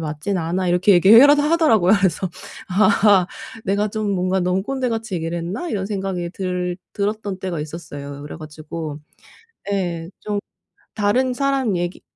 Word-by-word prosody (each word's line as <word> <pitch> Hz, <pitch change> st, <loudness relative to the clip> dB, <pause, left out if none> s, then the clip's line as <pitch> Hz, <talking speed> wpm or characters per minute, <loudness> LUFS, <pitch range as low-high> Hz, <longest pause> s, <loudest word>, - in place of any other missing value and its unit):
맞지는 160 Hz, +5 st, -3 dB
않아." 180 Hz, +3 st, -1 dB
이렇게 180 Hz, +3 st, +4 dB
얘기해 210 Hz, +9 st, +8 dB
라도 290 Hz, 0 st, +5 dB
하더라고요. 295 Hz, -, +4 dB
그래서 190 Hz, -1 st, 0 dB, 0.4 s
'아 200 Hz, -1 st, +4 dB, 0.4 s
내가 205 Hz, +2 st, +1 dB
좀 215 Hz, 0 st, -2 dB
뭔가 185 Hz, 0 st, 0 dB
너무 180 Hz, +2 st, 0 dB
꼰대같이 230 Hz, -4 st, -2 dB
얘기를 165 Hz, 0 st, -3 dB
했나?' 190 Hz, -, -4 dB
이런 200 Hz, -10 st, -2 dB
생각이 190 Hz, -4 st, -3 dB
들 180 Hz, -1 st, -3 dB, 0.2 s
들었던 205 Hz, -1 st, -2 dB
때가 185 Hz, -4 st, -4 dB
있었어요. 145 Hz, -2 st, -7 dB
그래 145 Hz, -, -8 dB
가지고 155 Hz, 0 st, -7 dB, 0.7 s
예 175 Hz, -4 st, -2 dB
좀 210 Hz, -1 st, -2 dB, 0.6 s
"다른 230 Hz, +5 st, +1 dB
사람 270 Hz, -6 st, 0 dB
얘기 175 Hz, +1 st, -3 dB
190 Hz, 325 characters per minute, -21 LUFS, 175-215 Hz, 0.7 s, 얘기해